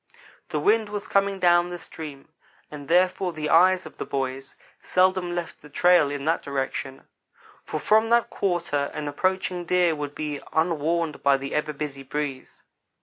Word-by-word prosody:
The 150 - -1
wind 215 +6 +2
was 205 0 -5
coming 200 0 +1
down 175 -1 +4
the 175 - -5
stream, 155 -4 -9 0.4
and 145 -2 -9
therefore 180 +1 +2
the 150 -1 -3
eyes 185 +2 +5
of - - -11
the - - -3
boys 135 0 -4 0.3
seldom 185 -1 +1
left 175 -1 -5
the 150 - -14
trail 175 -1 +4
in 145 -1 -4
that 160 +3 +1
direction; 135 -1 -4 0.6
for - - -4
from 220 +1 +3
that 235 0 +3
quarter 170 -7 -1
an 150 -1 -4
approaching 185 +3 -1
deer 175 -1 +2
would 145 -1 -5
be 150 -2 -4
unwarned 160 -1 0
by 140 -1 +4
the 140 +1 -6
ever 150 0 0
busy 140 -2 -5
breeze. 135 -1 -5
160 Hz, 165 wpm, -25 LUFS, 145-180 Hz, 0.6 s, eyes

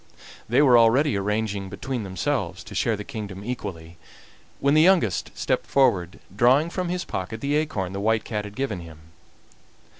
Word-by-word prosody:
They 130 +5 +4
were 125 -4 +7
already 120 +3 +4
arranging 100 -1 -2
between 120 +5 -4
themselves 95 -3 -2
to - - -11
share 115 -3 0
the 105 - -6
kingdom 100 -3 -7
equally, 85 -9 -6 0.6
when 140 +1 +2
the 155 - +6
youngest 170 - +3
stepped - - -1
forward, 95 -10 +2 0.2
drawing 130 +9 +4
from 180 -1 -3
his 180 0 -2
pocket 95 +4 -5
the 140 +4 -1
acorn 105 -12 -1
the 100 - -4
White 110 +1 +1
Cat 105 -2 -3
had 105 0 -9
given 130 -8 -2
him. 85 -2 -11
110 Hz, 170 wpm, -24 LUFS, 100-135 Hz, 0.6 s, were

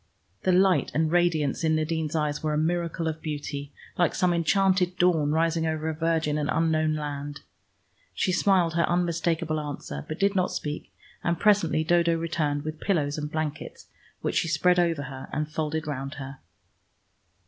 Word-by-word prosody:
The 185 - +2
light 185 -4 +4
and 160 +1 +2
radiance 170 -5 +1
in 160 -1 +3
Nadine's 155 0 -1
eyes 150 -1 0
were 155 -1 -1
a - - +1
miracle 170 +1 -1
of 160 0 -3
beauty, 145 -2 -5 0.3
like 175 - +2
some 180 -3 +2
enchanted 185 +1 +2
dawn 170 -5 +3
rising 165 +1 +1
over 155 0 -2
a 160 - 0
virgin 160 -1 0
and 150 - -1
unknown 155 -1 +2
land. 145 -1 -5 0.7
She 185 - +1
smiled 180 -3 +3
her 170 0 +1
unmistakable 170 -2 0
answer, 135 - -6
but 155 - -5
did 200 0 +2
not 185 -1 +2
speak, 150 0 -5 0.3
and 170 -1 0
presently 170 -7 +3
Dodo 170 0 +3
returned 155 -3 -1
with 155 0 -5
pillows 155 -6 0
and 150 0 -4
blankets, 155 -2 -4 0.3
which - - -1
she - - +1
spread 180 +3 +3
over 165 -4 +1
her 130 0 -8
and 150 0 -1
folded 155 0 -2
round 140 -1 -4
her. 135 -1 -8
160 Hz, 170 wpm, -26 LUFS, 150-170 Hz, 0.7 s, light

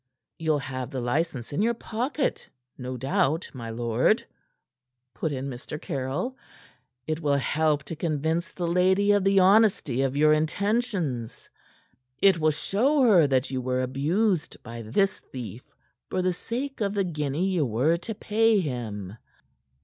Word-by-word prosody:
"You'll 160 -2 +1
have 130 -2 -5
the 135 -2 -4
license 125 +1 -2
in 145 - 0
your 235 +2 +2
pocket, 250 +6 -2 0.3
no 125 0 -5
doubt, 135 +5 0
my 120 -4 -7
lord," 115 +1 +1 0.9
put 160 +4 -2
in 135 -1 -3
Mr. 135 +3 -7
Caryll. 140 - -3 0.7
"It 155 0 -2
will 145 -2 +2
help 150 +1 +1
to 165 - -6
convince 160 +2 -1
the 175 -2 -3
lady 185 +4 +3
of 205 -1 +3
the 195 0 +4
honesty 190 - +4
of 135 0 0
your 155 +1 +5
intentions. 170 - -1 0.7
It 195 -4 +5
will 155 0 +3
show 250 - +1
her 185 - +6
that 130 -1 +1
ye 130 - -1
were 130 0 -1
abused 160 - 0
by 115 +1 -7
this 190 - 0
thief 125 -2 -8 0.5
for 185 - -1
the 185 0 +1
sake 250 +8 -5
of 200 0 0
the 200 - +2
guinea 155 +1 -1
ye 180 -4 +1
were 135 +5 +2
to 220 +5 -6
pay 220 +1 +2
him." 110 - -4
155 Hz, 150 wpm, -26 LUFS, 130-195 Hz, 0.9 s, her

